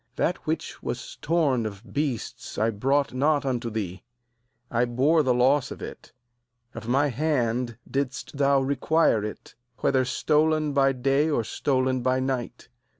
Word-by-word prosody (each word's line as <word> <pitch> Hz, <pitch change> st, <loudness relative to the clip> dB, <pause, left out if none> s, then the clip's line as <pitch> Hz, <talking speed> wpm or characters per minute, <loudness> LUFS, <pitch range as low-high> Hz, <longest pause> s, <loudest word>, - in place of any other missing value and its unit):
39That -, -, +1 dB
which -, -, -3 dB
was -, -, -5 dB
torn 140 Hz, -9 st, +1 dB
of 100 Hz, +1 st, -11 dB
beasts 140 Hz, -6 st, -3 dB
I 110 Hz, +1 st, +2 dB
brought 135 Hz, +7 st, +1 dB
not 145 Hz, +2 st, +2 dB
unto 120 Hz, -3 st, -1 dB
thee; 100 Hz, -5 st, -4 dB, 0.7 s
I 120 Hz, -1 st, +2 dB
bore 135 Hz, +7 st, +3 dB
the 130 Hz, -4 st, +1 dB
loss 130 Hz, +2 st, +3 dB
of -, -, -8 dB
it; -, -, -9 dB, 0.6 s
of 115 Hz, -, -8 dB
my 140 Hz, +4 st, +2 dB
hand 125 Hz, -4 st, 0 dB
didst 140 Hz, 0 st, -3 dB
thou 140 Hz, -1 st, +3 dB
require 140 Hz, -3 st, +2 dB
it, 105 Hz, -, -7 dB, 0.3 s
whether 130 Hz, -1 st, +3 dB
stolen 155 Hz, +3 st, +1 dB
by 135 Hz, -1 st, +4 dB
day 135 Hz, +4 st, +1 dB
or 145 Hz, -7 st, +1 dB
stolen 130 Hz, +2 st, 0 dB
by 130 Hz, +1 st, +1 dB
night. 130 Hz, -2 st, -3 dB
130 Hz, 150 wpm, -26 LUFS, 120-145 Hz, 0.7 s, by